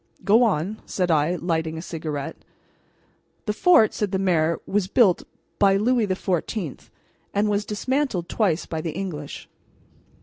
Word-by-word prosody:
"Go 220 +4 +5
on," 205 -2 0
said 180 -2 0
I, 155 +3 +2
lighting 160 -2 -2
a - - -5
cigarette. 155 -5 -5 1.1
"The 210 - 0
fort," 225 - +5
said 210 -2 -2
the 190 - +1
mayor, 170 -4 +1
"was 200 -1 0
built 200 -4 +4 0.4
by 195 -1 +5
Louis 235 +1 +2
XIV, 185 - -3 0.5
and 205 +1 +2
was 205 0 0
dismantled 235 - -1
twice 190 -7 0
by 160 -1 -4
the 160 -1 -4
English. 165 -6 -6
190 Hz, 140 wpm, -24 LUFS, 160-210 Hz, 1.1 s, Go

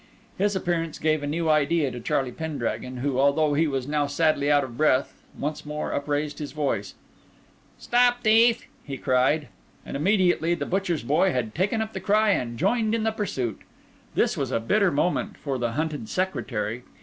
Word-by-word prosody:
His 200 +1 +1
appearance 170 -3 -1
gave 155 -1 +1
a 145 - -3
new 165 +3 -1
idea 155 -1 +2
to 120 - -6
Charlie 125 +2 -1
Pendragon, 130 -4 -4
who, 130 0 -1
although 145 +2 +3
he 160 +3 +2
was 135 -3 -2
now 145 -1 0
sadly 145 -1 +1
out 145 -1 +4
of 125 -3 -7
breath, 140 -2 +1 0.2
once 150 +2 -3
more 150 0 -4
upraised 145 +1 -2
his 150 -2 -6
voice. 150 -2 -2 0.8
"Stop, 245 0 +2
thief!" 230 +1 +4 0.2
he 140 -2 -6
cried. 130 +3 +2 0.4
And - - -6
immediately 175 0 +2
the 145 -4 -4
butcher's 180 -6 -1
boy 155 +9 +2
had 115 -4 -2
taken 205 +5 0
up 220 - -9
the 190 - -4
cry 210 +3 +3
and 120 -10 -1
joined 220 - +1
in 225 - -1
the 220 - +1
pursuit. 135 - -3 0.5
This - - +2
was - - -2
a - - 0
bitter 200 - +2
moment 170 +4 -1
for 135 -3 -3
the 120 -1 -1
hunted 150 -5 -3
secretary. 120 - -2
150 Hz, 180 wpm, -25 LUFS, 135-185 Hz, 0.8 s, out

